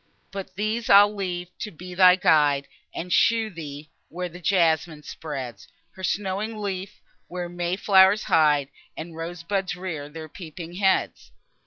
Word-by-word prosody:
But 195 -1 -7
these 215 +3 -2
I'll 205 +1 +7
leave 180 -3 -5
to 215 - -4
be 180 0 -10
thy 180 0 +7
guide, 145 -6 +3 0.2
And 180 +1 -4
show 225 -1 +3
thee, 150 -3 -9 0.2
where 180 +1 -4
the 175 +1 -11
jasmine 165 -4 +1
spreads 130 -12 -7 0.2
Her 190 - -12
snowy 195 +2 -1
leaf, 200 -3 -5 0.3
where 180 0 -5
may 175 0 -2
flow'rs 195 +1 +5
hide, 150 -3 +3 0.3
And 165 0 -7
rose 165 +1 -6
buds 190 0 -2
rear 165 -6 -6
their 160 +1 -8
peeping 170 +2 -9
heads. 190 -1 0
180 Hz, 150 wpm, -25 LUFS, 160-195 Hz, 0.3 s, I'll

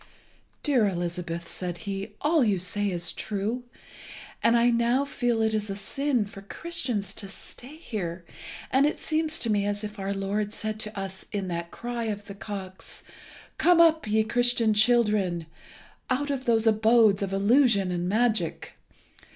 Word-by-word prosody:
"Dear 255 -8 +3
Elizabeth," 175 -2 -3
said 175 -1 -2
he, 195 +1 -4
"all 300 0 +3
you 205 -4 +2
say 200 +3 -1
is 175 -2 -2
true, 220 +4 -3 0.8
and 230 +1 +4
I 240 +1 +4
now 235 +4 +2
feel 240 -5 0
it 220 0 +1
is 215 -1 -1
a 195 - -3
sin 250 +3 -1
for 200 -1 -11
Christians 220 - -3
to 200 -2 -6
stay 250 +7 -10
here, 185 - -5 0.5
and 270 +2 +4
it 300 - -2
seems 315 0 0
to 235 -8 0
me 205 -1 +2
as 205 +1 -2
if 210 0 -6
our 195 0 -2
Lord 205 +2 -2
said 215 -1 -3
to 215 -2 -3
us 190 -1 -5
in 195 -3 -3
that 170 0 -3
cry 240 +2 -4
of 205 -2 -4
the 205 - -8
cocks, 195 -2 -7 0.6
'Come 350 -1 +5
up, 320 -6 +5
ye 220 +1 +3
Christian 240 -1 +2
children, 210 -6 +3 0.6
out 285 +3 0
of 265 -2 -3
those 225 -1 +3
abodes 220 -2 +4
of 195 -1 -2
illusion 200 -1 +3
and 175 0 -1
magic. 220 -5 0
215 Hz, 165 wpm, -27 LUFS, 195-245 Hz, 0.8 s, Come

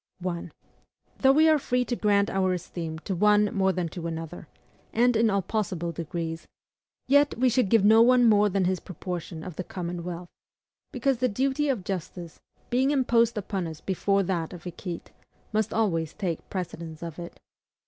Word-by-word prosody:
1. 175 -2 -4 0.7
Though 265 - +6
we 310 +3 +5
are 310 -1 +5
free 250 -2 0
to 245 - -2
grant 205 -2 +2
our 190 -1 +1
esteem 165 -2 -5
to 195 - -1
one 210 +2 +3
more 190 -1 +2
than 180 -2 -2
to 170 0 -6
another, 165 0 -6 0.4
and 245 +1 +3
in 225 0 +4
all 200 -2 +1
possible 185 -5 -2
degrees, 165 0 -5 0.6
yet 285 0 +4
we 255 +1 +3
should 240 -4 +2
give 220 -2 +4
no 220 +2 +7
one 245 +1 +6
more 210 -1 +5
than 195 -1 +1
his 185 0 0
proportion 175 -2 -6
of 180 -4 -8
the 185 - -2
common 175 -1 -5
wealth; 175 0 -6 0.6
because 275 -3 0
the 255 +1 +1
duty 270 +6 0
of 240 -8 -1
justice, 175 -2 -6 0.3
being 260 +3 +3
imposed 235 -5 +2
upon 195 -3 -3
us 160 -2 -8
before 195 +1 +1
that 175 -3 -2
of 175 -2 -10
equite, 175 -1 -7 0.4
must 215 0 +1
always 165 -8 0
take 175 -5 -4
precedence 170 -3 -6
of 165 0 -7
it. 170 0 -9
190 Hz, 180 wpm, -27 LUFS, 170-230 Hz, 0.7 s, no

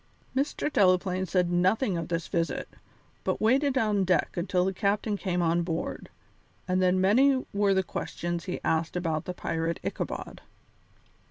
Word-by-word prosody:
Mr. 285 +2 -1
Delaplaine 185 -1 +3
said 180 0 +1
nothing 185 +4 +2
of 165 -1 -3
this 170 -1 -2
visit, 170 -3 -1 0.6
but - - -1
waited 265 +5 +2
on 210 -5 +2
deck 180 -4 +1
until 180 +1 0
the 190 - 0
captain 205 +2 0
came 180 -3 -1
on 170 +1 +2
board, 165 -1 -4 0.6
and 185 0 +1
then 185 0 +3
many 255 +8 +4
were 200 -1 +2
the 190 - +2
questions 175 -1 -4
he 180 - -3
asked 160 +2 0
about 165 -3 -1
the 180 - -4
pirate 165 0 -2
Ichabod. - - -4
185 Hz, 155 wpm, -28 LUFS, 175-205 Hz, 0.6 s, many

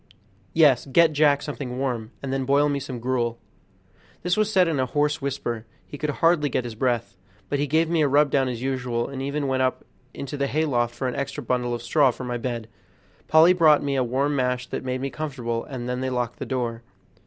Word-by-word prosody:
"Yes; 145 -6 +5
get 160 +3 +4
Jack 145 -1 +3
something 135 -4 -5
warm, 125 -5 -2
and 135 -1 -3
then 135 0 0
boil 140 +2 +3
me 140 -1 0
some 130 -2 -6
gruel." 120 -1 -1 0.9
This 180 +1 +1
was 215 0 +1
said 185 -3 +4
in 155 -4 0
a 130 - +1
hoarse 150 +3 0
whisper; 120 -5 -3 0.2
he - - -10
could 150 +1 -3
hardly 165 0 +2
get 125 - -1
his 120 -2 -6
breath, 120 -3 -1 0.3
but 145 - 0
he 145 - 0
gave 160 +3 +2
me 165 -1 +1
a 150 - +4
rub 145 +1 +3
down 135 -2 +2
as 120 -1 -5
usual, 125 -3 -1
and 135 -1 -6
even 140 +2 -2
went 130 -1 0
up 130 0 0 0.3
into 140 +1 -6
the 140 0 0
hayloft 125 -6 0
for 130 +2 -2
an 125 - -2
extra 140 +3 -4
bundle 120 0 -1
of 120 - -7
straw 145 -1 +4
for 125 - -5
my 125 -1 -3
bed. 115 -2 -4 0.6
Polly 160 +3 +6
brought 155 -5 +5
me 140 -1 -1
a 130 - +2
warm 135 +4 0
mash 125 -2 0
that - - -4
made 130 0 -3
me 135 0 -3
comfortable, 125 -7 -3
and 125 -3 -6
then 125 +1 -2
they 130 - -1
locked 125 -2 -2
the - - -5
door. 120 -3 -2
135 Hz, 225 wpm, -24 LUFS, 125-145 Hz, 0.9 s, Polly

